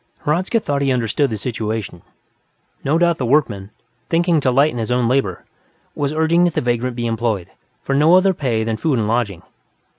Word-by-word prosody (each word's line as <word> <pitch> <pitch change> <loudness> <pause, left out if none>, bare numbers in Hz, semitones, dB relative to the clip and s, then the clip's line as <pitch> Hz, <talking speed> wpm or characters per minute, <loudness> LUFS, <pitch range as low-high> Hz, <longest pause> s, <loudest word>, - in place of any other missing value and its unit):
Hradzka 180 +9 +1
thought 145 -8 -2
he 135 -1 +1
understood 125 +3 0
the 110 - -3
situation; 110 -4 -4 0.8
no 145 +4 +1
doubt 170 -1 +2
the - - -1
workman, 115 -8 +1 0.4
thinking 170 -1 +2
to 135 - +1
lighten 135 0 +2
his 110 - -3
own 125 -1 +1
labor, 125 -8 -1 0.5
was 145 -1 -2
urging 160 +2 +2
that 175 - -1
the - - +2
vagrant 120 0 -1
be 120 -1 -3
employed, 115 -5 -2 0.3
for 135 - -2
no 150 +5 +5
other 190 +1 +4
pay 125 -9 -1
than 110 0 -2
food 145 +1 0
and 110 -2 0
lodging. 110 -6 -1
125 Hz, 185 wpm, -19 LUFS, 115-155 Hz, 0.8 s, no